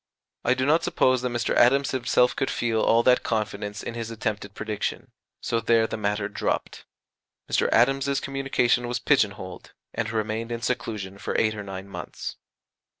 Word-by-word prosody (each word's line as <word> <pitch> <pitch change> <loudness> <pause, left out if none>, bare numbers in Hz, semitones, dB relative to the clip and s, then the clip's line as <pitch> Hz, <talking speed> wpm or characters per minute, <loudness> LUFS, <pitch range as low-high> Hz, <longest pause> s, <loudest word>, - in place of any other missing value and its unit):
I 130 - +3
do 130 - 0
not 155 +4 +3
suppose 130 -1 +2
that 125 - -1
Mr. 120 -1 -1
Adams 135 +3 +4
himself 125 -1 +2
could 135 - 0
feel 115 -2 0
all 115 +1 +4
that 125 0 +5
confidence 105 -2 -3
in - - -5
his 115 -1 -4
attempted 105 -2 -4
prediction. 110 -1 -4 0.3
So 115 - 0
there 115 0 +3
the - - -4
matter 105 -1 -1
dropped. 105 - -3 0.6
Mr. - - +2
Adams's 135 +3 +3
communication 135 -3 +1
was 120 0 -1
pigeon 115 -5 +3
holed, 95 -1 -9 0.2
and 115 -1 -2
remained 110 +1 -2
in 115 0 -4
seclusion 105 -5 -3
for - - -2
eight 110 -1 +2
or 105 - -6
nine 95 -1 -7
months. 90 -3 -7
115 Hz, 170 wpm, -25 LUFS, 105-125 Hz, 0.6 s, that